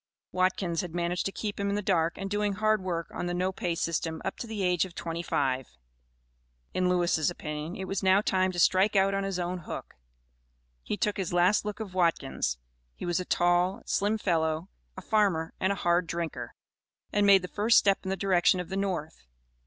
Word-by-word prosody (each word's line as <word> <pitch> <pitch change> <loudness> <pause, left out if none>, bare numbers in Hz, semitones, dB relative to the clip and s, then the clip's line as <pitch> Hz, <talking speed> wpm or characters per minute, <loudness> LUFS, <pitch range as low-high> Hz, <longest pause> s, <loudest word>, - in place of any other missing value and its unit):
Watkins 185 -2 0
had 175 -2 -7
managed 175 +1 -1
to - - -4
keep 205 0 -4
him 200 0 0
in 200 - 0
the 205 - -1
dark 170 -3 +1
and 195 - -4
doing 205 0 0
hard 215 0 +2
work 170 -3 -3
on 175 - -3
the 175 - -2
no 185 +1 0
pay 175 -2 -2
system 165 -1 -2
up 195 - -2
to 235 - -6
the 215 -3 -3
age 180 -2 +2
of 185 -3 -7
twenty 165 0 -4
five. 135 -6 -1 1.1
In 185 0 +1
Lewis' 175 -3 +2
opinion, 150 -1 -5
it 190 - -5
was 195 0 -2
now 190 +1 +5
time 185 -2 +1
to 180 - -8
"strike 190 +4 +4
out 195 0 +4
on 195 0 0
his 195 -2 -2
own 180 0 -2
hook;" 165 - -7 0.9
he 205 - -3
took 210 -1 0
his 185 -3 -3
last 180 +5 +3
look 210 0 -4
of 210 -4 -6
Watkins 155 - 0 0.4
(he - - -7
was 175 0 0
a 180 - -3
tall, 175 +2 +2
slim 210 +2 +1
fellow, 165 -3 0 0.3
a - - -7
farmer, 195 -7 +1
and 190 - +1
a - - 0
hard 175 0 +3
drinker), 170 -1 -4 0.6
and 205 -1 +3
made 195 -2 +7
the - - -4
first 215 +5 +3
step 195 -1 +4
in 190 - -4
the 190 - -1
direction 185 -1 +3
of 180 -2 -5
the 190 - -3
North. 170 - -3
185 Hz, 210 wpm, -28 LUFS, 170-195 Hz, 1.1 s, made